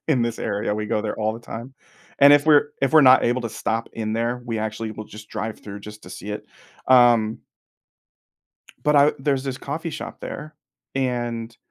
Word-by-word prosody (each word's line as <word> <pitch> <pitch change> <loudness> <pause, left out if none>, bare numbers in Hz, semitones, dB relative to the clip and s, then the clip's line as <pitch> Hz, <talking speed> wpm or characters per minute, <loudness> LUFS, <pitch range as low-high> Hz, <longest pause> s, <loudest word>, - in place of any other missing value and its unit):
in 130 -6 +3
this 115 -1 -2
area. 105 -1 -1
We 105 0 -3
go 105 - 0
there 105 - -3
all 110 0 0
the 115 - -9
time, 120 +3 -8 0.4
and 140 +1 +8
if 145 0 +5
we're 145 -1 +5
if 135 - +2
we're 155 - +8
not 130 0 +7
able 120 +2 +1
to 115 - -3
stop 110 +1 -3
in 110 -1 -3
there, 120 +2 -1
we 115 -2 -3
actually 110 +1 -3
will 110 0 -7
just 105 +1 -12
drive 110 0 -5
through 100 -1 -9
just 105 +1 -11
to 90 - -12
see 105 +2 -7
it. 105 - -6 0.4
Um 120 -4 +5 1.4
but 150 0 +3
I 145 +1 +6
there's 135 -1 0
this 135 -2 -4
coffee 160 +4 -4
shop - - -7
there, 155 0 -7 0.4
and 120 -3 -2
115 Hz, 200 wpm, -23 LUFS, 110-135 Hz, 1.4 s, and